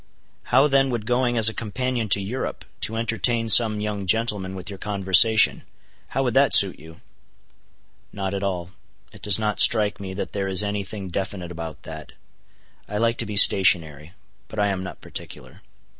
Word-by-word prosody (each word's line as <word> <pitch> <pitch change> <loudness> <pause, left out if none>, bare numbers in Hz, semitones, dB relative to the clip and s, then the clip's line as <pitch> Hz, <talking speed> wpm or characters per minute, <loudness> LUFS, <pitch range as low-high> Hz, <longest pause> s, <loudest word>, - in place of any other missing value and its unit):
"How 135 +4 +2
then 135 -1 +1
would 115 -4 -5
going 120 0 -1
as 110 -1 +6
a 110 - +2
companion 115 +1 -4
to 100 - +2
Europe, 105 +7 -6
to 110 - -3
entertain 115 0 -2
some 110 0 +6
young 105 -2 -5
gentleman 105 -3 -1
with 95 -1 -10
your 100 -2 -8
conversation,—how 105 +2 +1
would - - -2
that - - +4
suit - - +5
you?" 80 +2 -16 1.1
"Not 95 -1 -6
at 100 - -5
all. 90 -3 -5 0.4
It - - -16
does 105 -3 +3
not 105 -1 -3
strike 105 -3 +3
me 95 -1 -8
that 100 - -6
there 100 -1 -4
is 95 0 +3
any 100 -1 -4
thing 95 -1 -9
definite 95 -1 -6
about 80 -2 -9
that. 80 -1 -11 0.8
I 105 - -5
like 115 +1 -1
to - - -3
be 105 -1 -5
stationary. 85 -6 +4 0.3
But 110 - -13
I 105 -1 0
am 95 -2 -4
not 95 - -10
particular." - - -10
105 Hz, 175 wpm, -21 LUFS, 95-115 Hz, 1.1 s, as